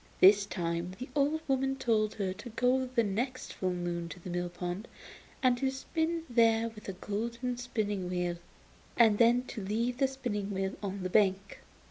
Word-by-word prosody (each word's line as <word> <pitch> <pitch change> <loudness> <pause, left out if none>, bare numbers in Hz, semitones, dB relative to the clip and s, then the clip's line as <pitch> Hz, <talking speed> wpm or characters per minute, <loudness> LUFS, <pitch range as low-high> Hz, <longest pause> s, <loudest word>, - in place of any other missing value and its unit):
This 200 +1 +7
time 170 -1 -2
the 255 +2 -7
old 295 +2 +2
woman 270 0 +1
told 220 -5 +1
her 195 -3 -1
to 205 +5 -9
go 255 +3 +2
the 250 -2 +1
next 240 +6 -2
full 185 - -1
moon 175 -1 -3
to 180 - -9
the 180 +1 -7
mill 175 0 -1
pond, 175 +4 -5 0.6
and 255 -1 +5
to 265 - +1
spin 320 +5 -2
there 230 -2 +3
with 210 -2 -10
a - - -3
golden 235 +6 -3
spinning 210 -6 -2
wheel, 180 -1 -1 0.6
and 220 -3 +5
then 240 +1 +5
to 220 -4 -7
leave 230 +5 -1
the 270 - +4
spinning 240 -7 -3
wheel 190 -1 -1
on 195 -2 -4
the 185 - -1
bank. 195 -1 +2
215 Hz, 180 wpm, -31 LUFS, 190-250 Hz, 0.6 s, This